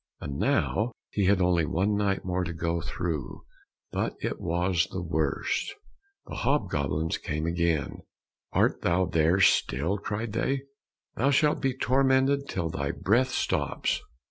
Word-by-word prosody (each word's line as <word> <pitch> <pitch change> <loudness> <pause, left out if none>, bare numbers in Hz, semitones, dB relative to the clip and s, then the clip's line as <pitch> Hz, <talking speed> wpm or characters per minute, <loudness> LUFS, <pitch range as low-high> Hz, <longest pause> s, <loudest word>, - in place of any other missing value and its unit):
And 70 -1 -5
now 115 +2 +1 0.2
he 100 - +1
had 95 0 +3
only 90 -2 +3
one 100 +5 +1
night 100 -1 0
more 90 0 0
to 85 -1 -3
go 85 0 -1
through, 80 -6 -4 0.5
but - - -1
it - - -3
was 85 0 +1
the 95 - -4
worst. 80 - -1 0.5
The - - -7
hob 130 -9 +1
goblins 75 +3 -1
came 75 +1 -3
again: 85 -3 0 0.5
"Art - - +2
thou 90 +2 +2
there 85 +2 +2
still?" 90 +1 +3
cried 105 +2 -4
they, 135 +4 0 0.5
"thou 135 +4 +2
shalt 150 +2 +3
be 130 -2 0
tormented 135 +2 +2
till 85 -4 -2
thy 70 -2 -2
breath 120 +6 +2
stops." - - -1
90 Hz, 145 wpm, -27 LUFS, 80-115 Hz, 0.5 s, had